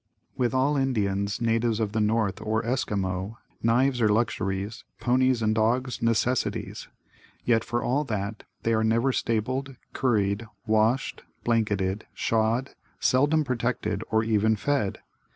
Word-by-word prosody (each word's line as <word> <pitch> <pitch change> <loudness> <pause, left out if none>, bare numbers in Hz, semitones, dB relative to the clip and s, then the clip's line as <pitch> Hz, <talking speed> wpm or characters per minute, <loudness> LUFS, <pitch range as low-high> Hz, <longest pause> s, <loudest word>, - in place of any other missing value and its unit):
With 125 -3 +1
all 140 +3 +2
Indians, 100 -6 0
natives 115 -1 +1
of 110 -2 0
the 110 +1 0
north 105 -2 +1
or 110 +1 -1
Esquimaux, 100 -4 -2 0.2
knives 125 +2 +2
are 110 - +4
luxuries, 105 -1 -1 0.2
ponies 130 -1 +2
and 110 0 +2
dogs, 120 +4 0
necessities. 115 +2 0 0.6
Yet, 115 -2 +3
for 120 +1 -2
all 140 +4 +1
that, 105 -2 -3 0.2
they 115 - +2
are 110 0 +2
never 115 +4 +2
stabled, 130 +5 -1 0.2
curried, 110 -3 +1 0.2
washed, 110 +4 +1 0.2
blanketed, 105 -4 0
shod, 115 +4 +1 0.3
seldom 145 +4 +3
protected 115 -5 -1
or 110 0 +2
even 110 0 +2
fed. 120 -3 0
115 Hz, 130 wpm, -26 LUFS, 105-125 Hz, 0.6 s, are